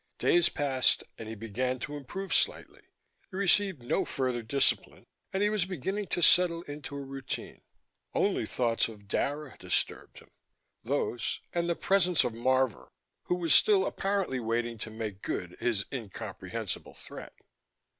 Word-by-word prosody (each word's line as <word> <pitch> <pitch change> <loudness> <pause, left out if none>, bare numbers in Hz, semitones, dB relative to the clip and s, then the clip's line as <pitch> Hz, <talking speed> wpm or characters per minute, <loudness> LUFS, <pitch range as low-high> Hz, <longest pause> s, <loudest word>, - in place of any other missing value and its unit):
Days 350 -4 +4
passed 135 -3 +2 0.2
and 110 -1 -6
he 110 - -5
began 115 +4 -2
to 145 +3 -5
improve 185 +8 -5
slightly: - - +1 0.5
he 185 - -7
received 195 -6 +3
no 120 - +1
further 130 -3 -1
discipline, 125 +5 +1 0.3
and 195 +1 0
he 210 - +4
was 210 -4 +1
beginning 190 +3 -3
to 175 - 0
settle 170 0 +6
into 145 -1 -7
a 140 - -4
routine. 135 0 -6 0.5
Only - - +1
thoughts 115 -2 +1
of 105 -3 -12
Dara 145 +6 -2
disturbed - - -1
him - - -15 0.5
those, 120 -1 -1
and 170 0 0
the 170 - +2
presence 180 -3 +3
of 120 - -1
Marvor, 130 +1 +1 0.4
who 180 - +1
was 170 -4 +2
still 200 -3 +6
apparently 195 -9 -1
waiting 115 0 -1
to 110 - -4
make 110 -3 -5
good 90 -1 -3
his 110 -5 0
incomprehensible 115 -7 -5
threat. - - -10
135 Hz, 150 wpm, -30 LUFS, 115-180 Hz, 0.5 s, settle